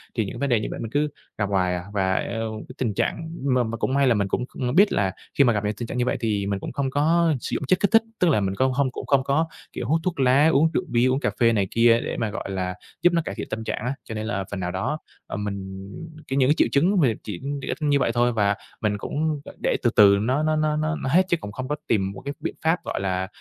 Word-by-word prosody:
Thì 110 - +1
những 95 - -6
vấn 140 - 0
đề 120 -3 +3
như 105 - -3
vậy - - -5
mình 115 - -5
cứ 150 +2 +1 0.3
gặp 100 -2 -1
hoài 90 -2 +1
à, 90 - -4
và 95 -2 +1
eo 110 +1 -3
cái 130 - -10
tình 115 -5 -1
trạng 160 +10 -2
m 140 -2 +1 0.2
mà 115 - -3
cũng 130 - -1
may 140 0 +3
là 125 - +5
mình 100 -3 0
cũng 125 - -1
kh 125 -1 -3
biết 200 +3 +6
là 95 -2 +1 0.3
khi 140 - +7
mà 120 -3 +4
gặp 105 -1 -1
những 105 - 0
tình 120 +2 -5
trạng - - -5
như 125 - +1
vậy 125 - 0
thì 105 -4 0
mình 100 -1 -1
cũng - - -6
không 140 -2 -1
có 160 +4 +3
sử - - -5
dụng - - -2
chất 185 - +3
kích 200 - +1
thích, 225 0 +6 0.2
tức 180 - +4
là 135 - +3
mình 95 -1 -1
cong 130 +4 +2
hông 135 0 +1
cũng - - -6
không 140 -2 +3
có, 140 +4 +1 0.3
kiểu, 120 - -4
hút 160 +5 +2
thuốc 180 -5 -2
lá, 135 +3 +5
uống 160 +1 +4
rượu - - +1
bia, 120 +1 +2
uống 130 +1 +2
cà - - 0
phê 115 -2 +5
này 100 -3 +1
kia 115 0 +5
để - - -3
mà, 110 - -1
gọi 100 - -5
là, 90 -1 -2 0.3
giúp 175 - +4
nó 170 - +3
cải - - -4
thiện - - -5
tâm 110 - -4
trạng - - -3
á. 125 - 0
Cho 110 - -7
nên 110 0 -3
là 100 -4 -1
phần 100 - -3
nào 90 -1 -2
đó, 95 +12 -2 0.3
ờ, - - -4
mình 95 -2 -5 0.4
cái 135 - -2
những 130 -1 +4
cái - - +6
triệu - - +4
chứng 180 +8 +3
mà 140 - +5 0.2
chỉ 100 -5 -6 0.2
đ - - -6
ích - - -2
như 145 -2 +3
vậy 120 - +1
thôi 120 +1 +3
và 100 -2 +2 0.3
mình 105 -1 0
cũng 150 +7 -2
g - - -8
để - - +2
từ 120 - +4
từ 100 -1 +7
nó 130 +7 +1
nó 155 0 +2
nó 155 0 +1
nó 155 +1 0
nó 135 - -1
hết 175 +7 +5
chứ 175 - +3
cũng 105 -10 -8
không 130 +4 -5
có 150 - -1
tìm 95 -3 +1
một 100 - -10
cái 140 - -3
biện 165 - -4
pháp, 160 +3 +1
gọi - - -3
là, 95 -1 -1
125 Hz, 305 wpm, -24 LUFS, 105-145 Hz, 0.4 s, khi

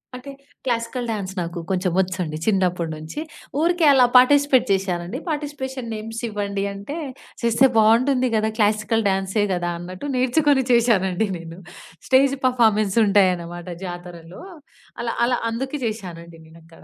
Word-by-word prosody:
అంటే 255 +3 -9 0.3
classical 240 0 -2
dance 195 -3 -4
నాకు 170 0 -4
కొంచెం 185 -1 0
వచ్చండి 180 -4 -2
చిన్నప్పటి 180 -5 0
నుంచి. 155 - -8 0.4
ఊరికే 340 0 +2
అలా 255 -2 +6
పార్టిసిపేట్ 280 0 +5
చేశానండి. 185 +2 -2
పార్టిసిపేషన్ 270 -5 -4
నేమ్స్ 225 +1 -6
ఇవ్వండి 200 -1 -3
అంటే 200 +11 -7 0.4
చేస్తే 235 +3 +4
బావుంటుంది 250 +4 +4
గదా! 215 0 +1
క్లాసికల్ 215 0 +1
డాన్సే 195 +2 0
గదా 175 -1 -2
అన్నట్టు 180 +8 -8
నేర్చుకొని 265 +2 +2
చేశానండి 220 -4 +2
నేను. 165 +1 -10 0.5
స్టేజ్ 275 +1 +4
పెర్ఫార్మన్స్ 220 -5 +2
ఉంటాయన్నమాట 180 -3 +1 0.2
జాతరలో. 175 - -9 0.6
అలా 235 -1 -2
అలా 245 0 +1
అందుకే 265 +5 -4
చేశానండి 170 -6 -8
నేను 165 +1 -16
అక్కడ. 165 0 -18
215 Hz, 130 wpm, -22 LUFS, 180-250 Hz, 0.6 s, అలా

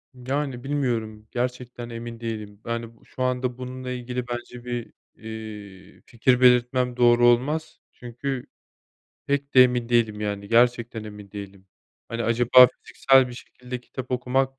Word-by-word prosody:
Yani, 130 0 -3
bilmiyorum, 115 -7 -2
gerçekten 125 -1 -4
emin 115 0 -7
değilim. 110 -3 -6
Yani, 115 0 -4
b - - -25
şu 130 - -5
anda 125 -1 -1
bununla 130 0 -6
ilgili 125 0 -4
bence 120 0 -7
bir, 120 -1 -5 0.2
eee, 110 -3 -10
fikir 125 +2 +1
belirtmem 125 0 +4
doğru 120 0 +5
olmaz. 145 +7 +1
Çünkü 125 +2 -5 0.8
pek 140 0 -1
de 130 - +10
emin 125 -2 0
değilim 115 -3 +2
yani, 100 -1 -3
gerçekten 120 -1 +2
emin 105 -2 -10
değilim. 100 -2 -9 0.4
Hani, 115 0 -3
acaba 120 +2 +7 0.2
fiziksel 135 -1 +4
bir 125 - -8
şekilde 125 0 -8
kitap 130 0 -8
okumak 130 +1 0
120 Hz, 140 wpm, -24 LUFS, 115-125 Hz, 0.8 s, de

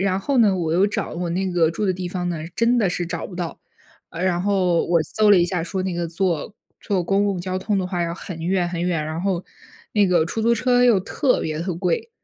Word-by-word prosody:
然 190 0 +1
后 275 +4 0
呢， 205 -5 +4
我 165 -3 -1
又 185 +4 +4
找 205 - -3
我 175 0 -3
那 185 +2 -1
个 170 -2 +2
住 210 +5 -3
的 185 - +2
地 180 0 -5
方 180 0 -3
呢， 170 - -2 0.2
真 235 +1 +3
的 205 - +2
是 175 -1 -2
找 165 -1 -4
不 185 - -11
到。 175 -2 -5 0.5
呃， 170 - -5
然 180 -2 +1
后 185 -4 +2
我 170 -2 +3
搜 210 +6 +2
了 200 - +7
一 175 - +4
下， 175 -1 -2
说 185 +2 -3
那 185 -1 -2
个 170 0 -2
坐 175 +2 -1 0.3
坐 195 -4 -1
公 195 +2 +2
共 190 -3 -1
交 185 +1 -3
通 200 +1 -1
的 185 - -1
话 180 -1 -2
要 170 0 -2
很 175 -1 -8
远 175 +1 0
很 175 -1 -3
远， 170 -4 0
然 155 +2 -4
后 185 -2 -1 0.5
那 205 -2 +4
个 175 -3 +3
出 225 - -3
租 235 +1 +4
车 250 0 +2
又 230 -5 +5
特 250 +7 0
别 155 -1 -3
地 175 +1 -2
贵。 180 - -1
180 Hz, 275 characters per minute, -22 LUFS, 170-200 Hz, 0.5 s, 了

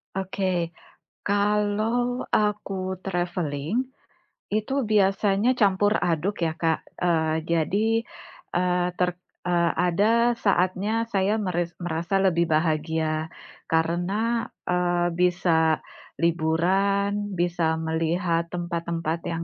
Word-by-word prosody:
Oke. 185 -3 -1 0.6
Kalau 210 +4 +1
aku 195 -3 0
traveling, 175 - -1 0.7
itu 215 +5 -1
biasanya 205 +2 +3
campur 205 0 +3
aduk 175 +3 -1
ya 160 - -1
Kak, 160 -1 +1 0.2
eee, 160 -2 +2
jadi, 170 +6 +1 0.7
eee, 180 0 +1
ter 180 0 +2 0.4
eee, 170 -1 +2
ada 225 +7 +3
saatnya 190 +2 +1 0.2
saya 200 +3 +2
meris 175 -1 -1
merasa 170 +3 -1
lebih 170 -3 +3
bahagia, 155 0 0 0.4
karena, 180 +8 0 0.2
eee, 175 -1 +1
bisa 170 -3 +2 0.4
liburan, 195 +5 +1
bisa 170 -2 +1
melihat 165 +1 0
tempat-tempat 170 -2 -2
yang 165 0 -3
180 Hz, 95 wpm, -25 LUFS, 165-200 Hz, 0.7 s, biasanya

